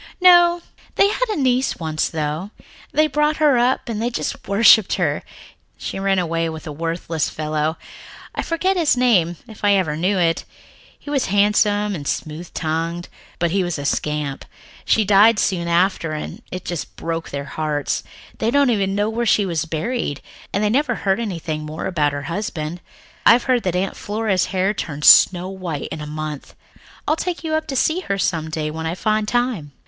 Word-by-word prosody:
"No. 350 -1 +6 0.3
They 400 - +4
had - - -1
a 425 - -1
niece 260 -2 +1
once, 155 -2 -1
though. 155 +4 -3 0.4
They 310 - +3
brought 300 0 +1
her 295 -5 +4
up 250 +2 +1
and 220 -2 -3
they 235 - 0
just 240 - -4
worshipped 210 0 +5
her. - - 0 0.6
She - - -5
ran 195 0 +1
away 165 -2 0
with 160 -1 -8
a 155 - -5
worthless 165 +1 -2
fellow 155 +1 -2 0.6
I - - -2
forget 370 +4 0
his 315 -7 +3
name, 185 -9 +3
if 220 -2 -13
I 205 0 +5
ever 170 -6 0
knew 185 +5 0
it. 165 -2 +1 0.5
He 290 - -9
was 275 -3 0
handsome 205 +1 +2
and 145 -6 -5
smooth 160 +3 -4
tongued, 165 +2 -2 0.3
but 170 -1 0
he 195 +1 +1
was 175 -2 -2
a 145 - -5
scamp. 150 -1 -2 0.4
She 220 - +3
died 210 +3 +6
soon 175 -4 0
after 170 -2 +1
and 155 - -6
it 185 0 -7
just 175 -4 -5
broke 165 0 -4
their 140 0 -5
hearts. 150 -1 -2 0.4
They 225 - +1
don't 280 0 +3
even 195 -3 0
know 205 +1 +1
where 230 +2 -1
she 205 -1 +3
was 165 -4 -1
buried, 165 - -3 0.3
and 200 - 0
they 210 - +2
never 255 -1 +1
heard 195 0 0
anything 165 -8 -4
more 155 +1 -6
about 155 -6 +1
her 145 0 -5
husband. 170 -1 -4 0.4
I've 235 +1 +6
heard 255 -2 +2
that 180 -4 -2
Aunt 190 +2 -1
Flora's 205 -3 -1
hair 190 +2 0
turned 150 -7 -4
snow 180 0 +7
white 180 -6 -5
in 155 - -5
a 150 - -6
month. 150 -1 -6 0.5
I'll 310 - +3
take 350 +1 -4
you 315 -1 -2
up 315 0 -1
to 270 - -4
see 315 +7 +2
her 200 - -2
some 160 -4 -1
day 155 -1 -3
when 160 +1 -4
I 165 - -2
find 215 +1 0
time." 235 - -1
190 Hz, 190 wpm, -20 LUFS, 160-230 Hz, 0.6 s, snow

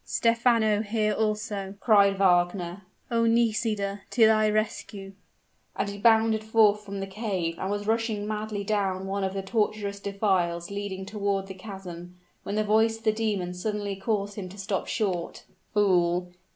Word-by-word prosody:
"Stephano 230 -2 +2
here 215 0 0
also!" 210 -2 -2
cried 200 -4 +4
Wagner. 175 0 +2 0.3
"Oh! 230 0 +2
Nisida 220 -3 +1
to 230 -3 +5
thy 215 -1 +4
rescue!" 210 -2 -3 0.6
And - - -1
he 200 0 -7
bounded 220 0 +4
forth 215 -1 +4
from 200 -1 -6
the - - -2
cave, 190 -5 -3
and 190 - -2
was 205 0 -2
rushing 220 -1 0
madly 215 -1 -3
down 195 -2 -1
one 195 +1 -2
of 190 0 -2
the 195 - -3
tortuous 205 0 -1
defiles 190 -4 0
leading 200 -1 -4
toward 200 -1 -1
the 195 - -8
chasm, 185 -3 -9 0.3
when 200 - -4
the 215 - +2
voice 220 +2 +3
of 225 - -20
the 215 - +4
demon 210 -5 -2
suddenly 205 +2 -3
caused 205 0 -2
him 185 -2 -6
to 195 - -12
stop 195 -1 -2
short. 185 -6 -2 0.3
"Fool! 180 -3 +2
205 Hz, 160 wpm, -27 LUFS, 195-215 Hz, 0.6 s, to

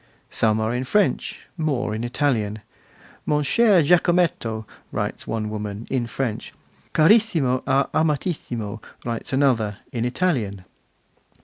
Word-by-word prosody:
Some 110 -1 +2
are 110 +1 0
in 125 +1 -1
French, 205 +9 0 0.2
more 140 -9 -1
in 110 +2 -3
Italian. 120 -5 0 0.7
'Mon 150 0 +2
cher 205 +1 +4
Giacometto', 170 -9 +2 0.3
writes - - -3
one 110 -1 -2
woman, 105 0 -5
in 125 -3 0
French; 115 -2 -3 0.4
'Carissimo 160 - +4
a 135 0 +3
Amatissimo', 140 - -1 0.2
writes 115 -1 -3
another, 125 -7 +2
in 120 -4 -2
Italian. 120 - -1
125 Hz, 115 wpm, -23 LUFS, 110-155 Hz, 0.7 s, cher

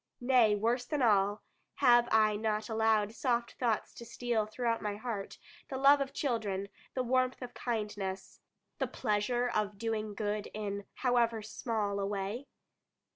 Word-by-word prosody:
Nay, 245 -4 +4
worse 235 +4 +1
than 290 0 -1
all 205 -2 +3 0.3
have 240 -3 +5
I 215 -1 +4
not 215 0 -1
allowed 220 -1 +2
soft 235 -1 0
thoughts 230 -4 0
to - - -10
steal 235 -2 -1
throughout 230 +1 -1
my 205 -1 -2
heart, 215 -2 -5 0.3
the 265 - -3
love 280 +1 +6
of 275 - -2
children, 205 -7 -2 0.3
the 255 - 0
warmth 255 +1 +1
of 245 - -8
kindness, 210 -5 -4 0.4
the - - +1
pleasure 240 +2 0
of 210 -3 -1
doing 215 -1 -2
good 210 0 -2
in 200 -1 -4
however 235 -3 +1
small 210 -2 -2
a 195 - -1
way? 205 +6 -3
220 Hz, 150 wpm, -32 LUFS, 210-245 Hz, 0.4 s, love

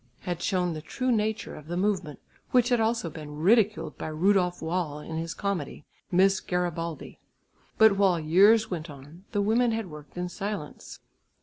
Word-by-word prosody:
had 175 -2 -4
shown 180 -3 0
the 155 - -6
true 255 - -2
nature 220 -1 -1
of 150 0 -11
the 175 +1 -3
movement, 185 -6 -1 0.3
which 250 -1 +3
had 245 -2 +3
also 225 -4 0
been 150 -2 -8
ridiculed 210 +5 +2
by - - -4
Rudolf 180 +3 +2
Wall 160 -2 -2
in 160 +2 -6
his 165 0 -4
comedy, 180 -8 -3 0.3
Miss 190 +2 +4
Garibaldi. 170 -2 -3 0.6
But 220 -3 +6
while 190 -4 +3
years 200 +8 +4
went 170 -2 -4
on, 145 +6 -13
the 205 -1 0
women 230 +3 +2
had 220 -6 -4
worked 150 +2 -12
in 180 0 -2
silence. 195 -4 -6
180 Hz, 170 wpm, -27 LUFS, 160-210 Hz, 0.6 s, But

